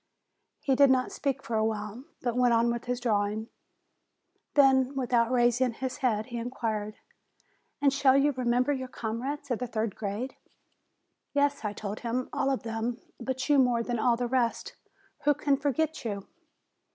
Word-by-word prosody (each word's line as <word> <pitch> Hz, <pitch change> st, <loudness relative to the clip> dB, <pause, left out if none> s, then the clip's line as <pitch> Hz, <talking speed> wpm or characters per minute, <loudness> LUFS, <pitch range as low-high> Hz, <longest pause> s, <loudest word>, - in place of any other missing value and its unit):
He 275 Hz, -, +1 dB
did 280 Hz, +1 st, +6 dB
not 255 Hz, -1 st, +2 dB
speak 275 Hz, -1 st, -2 dB
for 230 Hz, -, -3 dB
a 220 Hz, -, +2 dB
while, 220 Hz, +3 st, -3 dB, 0.2 s
but 240 Hz, -2 st, 0 dB
went 250 Hz, -1 st, +4 dB
on 235 Hz, +1 st, +3 dB
with 235 Hz, 0 st, -4 dB
his 250 Hz, 0 st, -2 dB
drawing. 215 Hz, -1 st, 0 dB, 1.1 s
Then, 270 Hz, -1 st, +5 dB
without 240 Hz, -3 st, +2 dB
raising 245 Hz, 0 st, +3 dB
his 260 Hz, +2 st, -4 dB
head, 220 Hz, -5 st, 0 dB
he 240 Hz, -1 st, -5 dB
in 235 Hz, +1 st, -3 dB
quired: 215 Hz, -4 st, -3 dB, 0.9 s
"And 280 Hz, -1 st, +5 dB
shall 275 Hz, -1 st, +4 dB
you 285 Hz, +1 st, +4 dB
remember 250 Hz, +1 st, +1 dB
your 260 Hz, -2 st, -4 dB
comrades 255 Hz, +5 st, -4 dB
of 240 Hz, -, 0 dB
the 250 Hz, -, -3 dB
third 220 Hz, -3 st, -2 dB
grade?" 215 Hz, +5 st, -4 dB, 1.0 s
"Yes," 285 Hz, -1 st, +1 dB
I 210 Hz, -1 st, -2 dB
told 205 Hz, 0 st, -5 dB
him, 245 Hz, +1 st, -2 dB
"all 270 Hz, -, +1 dB
of 270 Hz, -, -1 dB
them; 230 Hz, +2 st, -3 dB, 0.2 s
but 260 Hz, +1 st, -3 dB
you 290 Hz, -2 st, +5 dB
more 245 Hz, -3 st, +3 dB
than 240 Hz, -1 st, -2 dB
all 235 Hz, +2 st, +3 dB
the 245 Hz, -, -1 dB
rest. 240 Hz, -1 st, 0 dB, 0.5 s
Who 295 Hz, 0 st, +5 dB
can 285 Hz, -1 st, +2 dB
forget 295 Hz, +3 st, -1 dB
you?" 200 Hz, -4 st, -4 dB
245 Hz, 175 wpm, -29 LUFS, 230-265 Hz, 1.1 s, did